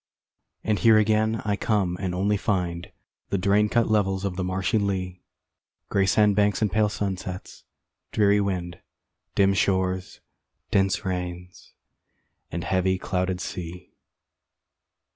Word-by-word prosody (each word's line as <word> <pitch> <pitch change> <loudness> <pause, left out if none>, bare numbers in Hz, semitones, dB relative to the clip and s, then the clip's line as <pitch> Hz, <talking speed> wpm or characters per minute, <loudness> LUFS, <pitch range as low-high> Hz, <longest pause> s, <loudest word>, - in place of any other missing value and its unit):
And 105 -2 0
here 110 -2 +6
again 110 +1 +2
I 105 -1 +1
come 100 -4 0
and 95 -2 -2
only 100 +3 +1
find 90 -5 -2 0.4
The 100 - 0
drain 100 +3 +2
cut 115 +1 +2
levels 100 -3 +1
of 95 -2 -2
the 95 - -2
marshy 95 +3 0
lea, 95 -3 -2 0.7
Gray 95 -1 +2
sand 105 +1 +4
banks 105 0 +2
and 105 -3 +1
pale 105 +1 +2
sunsets 95 -2 -5 0.5
dreary 105 -1 +3
wind, 90 -3 -3 0.6
Dim 100 0 +4
shores, 95 -1 0 0.5
dense 95 -1 +1
rains, 90 -3 -5 0.8
and 85 0 -3
heavy 95 0 +1
clouded 90 -1 -2
sea. 90 0 -7
95 Hz, 125 wpm, -25 LUFS, 90-105 Hz, 0.8 s, here